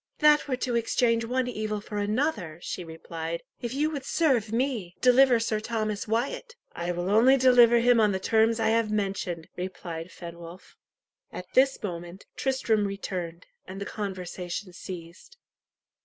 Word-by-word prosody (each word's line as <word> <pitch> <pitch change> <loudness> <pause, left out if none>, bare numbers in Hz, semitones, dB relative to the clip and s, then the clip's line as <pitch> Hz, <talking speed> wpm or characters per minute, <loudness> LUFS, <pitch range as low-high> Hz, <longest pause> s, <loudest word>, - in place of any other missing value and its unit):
"That 300 -1 +5
were 260 - 0
to 250 -1 -2
exchange 230 0 +1
one 250 +2 0
evil 215 -3 -3
for 205 0 -5
another," 205 - -1
she 180 - -4
replied, 165 0 -6 0.2
"If 240 +1 -4
you 305 +2 +1
would 285 -3 -4
serve 260 -8 +1
me, 230 -7 -1
deliver 250 -1 +5
Sir 225 -1 -1
Thomas 215 -2 -3
Wyat." 250 - -2 0.2
"I 175 +1 -3
will 175 +1 -3
only 245 +6 +6
deliver 245 -2 +6
him 245 0 +5
on 210 -2 +4
the 190 - -1
terms 225 +3 +2
I 220 -1 +2
have 225 -1 +2
mentioned," 195 -5 -2
replied 180 -2 -6
Fenwolf. 170 +1 -11 0.6
At 180 - -7
this 270 -1 +3
moment, 175 -1 -6
Tristram 225 -6 +1
returned, 180 -3 -5 0.2
and 190 +1 -7
the 200 - -4
conversation 185 -2 -5
ceased. 170 - -10
215 Hz, 155 wpm, -27 LUFS, 180-245 Hz, 0.6 s, only